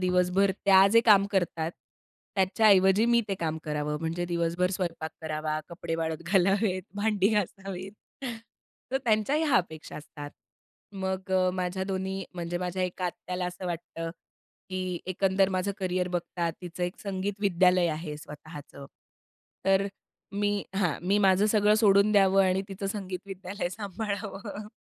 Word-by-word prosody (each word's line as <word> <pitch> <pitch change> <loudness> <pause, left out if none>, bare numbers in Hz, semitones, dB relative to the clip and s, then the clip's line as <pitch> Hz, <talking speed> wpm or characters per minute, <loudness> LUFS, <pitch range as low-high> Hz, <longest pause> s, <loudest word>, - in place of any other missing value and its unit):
दिवसभर 180 +2 +3
त्या 195 -1 +7
जे 230 - +7
काम 200 -2 +7
करतात, 170 -4 0 0.7
त्याच्याऐवजी 195 +1 +5
मी 235 0 +4
ते 195 - 0
काम 160 -3 -2
करावं 150 0 -2
म्हणजे 165 +2 -2
दिवसभर 170 +1 0
स्वयंपाक 170 -4 -3
करावा, 155 -1 -2
कपडे 170 -1 -4
वाळत 160 -1 -1
घालावेत, 195 +1 +2
भांडी 205 -1 +2
घासावीत. 195 -1 -3 1.0
तर - - +3
त्यांच्याही 230 +8 +2
ह्या 290 -5 +4
अपेक्षा 160 -4 -3
असतात. 145 -1 -9 0.6
मग 190 0 -3
अ, 185 -1 +3
माझ्या 185 +1 -2
दोन्ही 190 0 -3
म्हणजे 175 0 -3
माझ्या 180 +1 -2
एका 180 0 -3
आत्याला 180 +1 -4
असं 180 +1 -6
वाटतं, 165 -1 -4 0.6
की 185 -1 -3
एकंदर 190 +1 +2
माझं 185 +1 0
करियर 185 -1 -1
बघतात 175 -1 -2
तिचं 175 0 -6
एक 180 - -5
संगीत 200 0 -3
विद्यालय 180 -2 +4
आहे 155 -1 -4
स्वतःचं. 150 -2 -10 0.8
तर 195 +1 +3 0.5
मी 205 0 0
हां. 180 -7 +1
मी 200 +2 +3
माझं 195 0 +4
सगळं 210 -1 +4
सोडून 210 -1 +5
द्यावं 195 -1 +5
आणि 185 +1 +1
तिचं 195 0 -5
संगीत 190 -2 -4
विद्यालय 195 0 -4
सांभाळावं. 205 +1 -5
185 Hz, 140 wpm, -28 LUFS, 175-200 Hz, 1.0 s, त्या